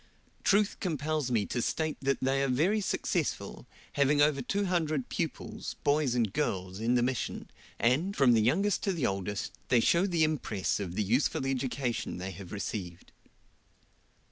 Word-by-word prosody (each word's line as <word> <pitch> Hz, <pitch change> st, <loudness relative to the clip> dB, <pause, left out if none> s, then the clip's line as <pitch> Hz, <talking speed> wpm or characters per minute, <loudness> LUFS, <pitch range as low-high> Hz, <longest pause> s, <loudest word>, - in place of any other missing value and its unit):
Truth 205 Hz, 0 st, +3 dB
compels 155 Hz, -4 st, -1 dB
me 110 Hz, -5 st, +1 dB
to 120 Hz, -, -2 dB
state 155 Hz, +5 st, -1 dB
that 135 Hz, 0 st, +1 dB
they 135 Hz, +1 st, +2 dB
are 140 Hz, -, +2 dB
very 165 Hz, +12 st, +2 dB
successful, 190 Hz, -, -2 dB, 0.3 s
having 145 Hz, +1 st, +3 dB
over 145 Hz, -1 st, +4 dB
two 200 Hz, +10 st, -1 dB
hundred 155 Hz, -7 st, 0 dB
pupils, -, -, -4 dB
boys 145 Hz, -3 st, +2 dB
and 115 Hz, -5 st, +1 dB
girls, 95 Hz, +1 st, -2 dB
in 115 Hz, +3 st, +1 dB
the 120 Hz, -, +3 dB
Mission, 125 Hz, -1 st, -3 dB, 0.3 s
and, 145 Hz, -, +1 dB
from 130 Hz, -3 st, +5 dB
the 110 Hz, 0 st, +4 dB
oldest 200 Hz, +4 st, +1 dB
to 195 Hz, -, 0 dB
the 165 Hz, -6 st, -3 dB
youngest, 100 Hz, +1 st, -2 dB, 0.2 s
they 125 Hz, -, +4 dB
show 170 Hz, -, +3 dB
the 170 Hz, -4 st, +2 dB
impress 140 Hz, -13 st, 0 dB
of 90 Hz, -3 st, -4 dB
the 105 Hz, -, +1 dB
useful 125 Hz, +6 st, +1 dB
education 130 Hz, -4 st, -2 dB
they 95 Hz, +1 st, -5 dB
have 95 Hz, 0 st, -10 dB
received. 95 Hz, -4 st, -5 dB
135 Hz, 165 wpm, -30 LUFS, 110-155 Hz, 0.3 s, from